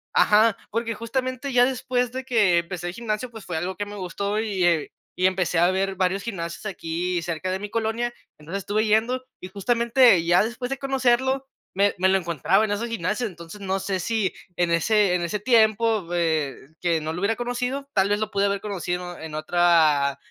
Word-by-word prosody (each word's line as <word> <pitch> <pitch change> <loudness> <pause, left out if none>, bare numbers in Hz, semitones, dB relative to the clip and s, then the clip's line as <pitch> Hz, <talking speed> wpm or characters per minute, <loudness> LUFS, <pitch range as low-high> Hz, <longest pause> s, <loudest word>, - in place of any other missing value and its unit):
ajá, 215 +1 +5
porque 230 +1 -1
justamente 255 +3 -3
ya 245 0 +6
después 250 -1 -1
de 260 0 -4
que, 215 -9 +3
empecé 175 0 -5
el 175 - -4
gimnasio, 235 +1 -3
pues 220 -3 -11
fue 175 - -5
algo 180 +4 -3
que 205 - -3
me 205 0 -9
gustó 200 +3 -2
y, 205 -4 -1
eh, 170 -3 +1 0.2
y 185 - +3
empecé 180 -3 0
a 175 +1 +5
ver 195 +1 0
varios 190 +1 0
gimnasios 170 -5 -5
aquí 175 -2 -2
cerca 170 +2 -3
de 190 - -2
mi 205 +1 -6
colonia. 230 +2 -1 0.3
Entonces 165 +6 -5
estuve 215 +3 0
yendo, 230 +4 +2 0.2
y 185 - -7
justamente 235 0 +3
ya 175 +1 +5
después 240 +3 -4
de 270 - -2
conocerlo, 265 0 +1 0.3
me 200 +1 +3
me 190 - +4
lo 195 - +4
encontraba 170 +3 +1
en 210 - -3
esos 210 +3 -1
gimnasios. 215 +3 -2
Entonces 170 +3 -11
no 195 0 -1
sé 190 0 -2
si 215 +1 -1 0.2
en 175 0 +1
ese 200 +3 +3
en 180 - 0
ese 175 +5 -2
tiempo, 220 -3 +3
eh, 160 -5 0 0.3
que 170 -2 +1
no 155 +1 -3
lo 170 - -4
hubiera 210 +3 +1
conocido. 250 +3 -3
Tal 195 0 +2
vez 205 0 +1
lo 215 0 -3
pude 200 -1 +1
haber 200 0 0
conocido 180 -3 -4
en 160 -1 -7
otra 155 -4 +3
200 Hz, 200 wpm, -24 LUFS, 175-230 Hz, 0.3 s, ya